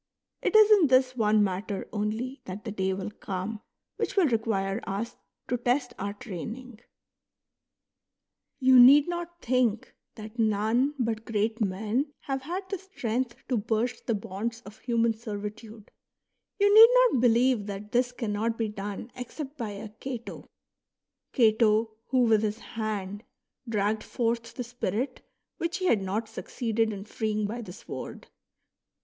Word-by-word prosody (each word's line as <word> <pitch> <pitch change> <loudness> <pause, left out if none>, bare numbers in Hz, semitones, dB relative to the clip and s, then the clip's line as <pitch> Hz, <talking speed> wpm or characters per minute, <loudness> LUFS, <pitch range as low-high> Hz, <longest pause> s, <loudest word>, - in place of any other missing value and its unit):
It - - 0
is 430 0 +8
in 395 -7 +7
this 255 -1 +3
one 215 -2 +3
matter 195 +1 -3
only 220 +5 -3
that 190 +4 -7
the 220 - -3
day 190 -2 -1
will 190 +2 -4
come 200 +2 -5 0.4
which - - -2
will 390 -4 +5
require 220 -5 0
us 205 +4 -3 0.3
to 245 - 0
test 245 +1 0
our 200 +1 -3
training. 225 +3 -8 1.8
You 260 -1 +7
need 280 +5 +8
not 345 0 -5
think 240 -3 +1 0.2
that 215 +2 -10
none 220 +6 +2
but 225 -3 -1
great 225 +1 -1
men 215 +9 -1
have 270 -1 -3
had 360 +7 -5
the 390 - -2
strength 255 - -3
to 250 - +1
burst 225 +3 -1
the 230 - +2
bonds 225 +3 -4
of 210 -1 -13
human 230 -2 +1
servitude; 215 0 -8 0.7
you 405 0 +4
need 450 +2 +11 0.2
not 250 - +1
believe 240 -2 +3
that 205 +1 -6
this 245 +1 +2
cannot 225 -1 -2
be 225 -2 -1
done 205 +3 -6
except 270 +3 -7
by 235 -7 -4
a 205 +1 -7
Cato, 240 +2 -7 0.4
— - - -60
Cato, 220 -2 +3 0.2
who 255 -1 +3
with 220 -3 +4
his 215 0 -1
hand 210 -3 -4 0.5
dragged 210 0 0
forth 230 -1 -2
the 250 - -3
spirit 245 +1 -3 0.4
which 335 +2 -2
he 370 - -3
had 225 - +3
not 205 +4 -2
succeeded 225 0 -2
in 200 -1 -6
freeing 215 0 -2
by 230 +4 -4
the 210 - -8
sword. 180 - -8
225 Hz, 150 wpm, -28 LUFS, 210-250 Hz, 1.8 s, need